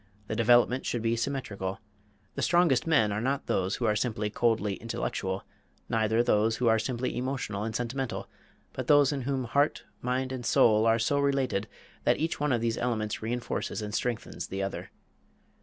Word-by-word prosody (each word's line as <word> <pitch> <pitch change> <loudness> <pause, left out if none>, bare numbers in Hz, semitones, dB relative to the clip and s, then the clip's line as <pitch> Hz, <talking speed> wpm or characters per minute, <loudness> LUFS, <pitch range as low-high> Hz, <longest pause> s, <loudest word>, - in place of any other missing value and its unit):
The 110 - -4
development 120 +2 +4
should 120 -2 -2
be 115 0 +2
symmetrical. 110 -7 -3 0.5
The - - -4
strongest 170 -7 +3
men 125 -10 +3
are 105 +1 -1
not 135 +3 -1
those 95 +1 0
who 120 - -2
are 105 -1 +2
simply 105 -2 -1
coldly 110 -2 +1
intellectual, 95 -4 -3 0.5
neither 110 +1 +2
those 110 0 +2
who 125 - -1
are 110 0 +4
simply 125 +3 -2
emotional 125 -6 -3
and 110 0 -4
sentimental, 125 +1 -3 0.5
but - - -5
those 145 -2 +6
in 140 -2 -2
whom 135 -2 0
heart, 140 +5 +1 0.2
mind, 130 +1 -1
and 130 -2 -4
soul 110 -1 +4
are 115 0 +4
so 130 +5 +1
related 135 -7 0 0.4
that - - +3
each 160 +1 -2
one 145 -1 +1
of 120 -2 +1
these 115 -1 0
elements 110 -3 -1
re 110 +1 -3
enforces 120 -2 -3
and 105 0 -5
strengthens 120 0 -3
the 95 +1 -3
others. 95 - -4
115 Hz, 180 wpm, -29 LUFS, 110-130 Hz, 0.5 s, those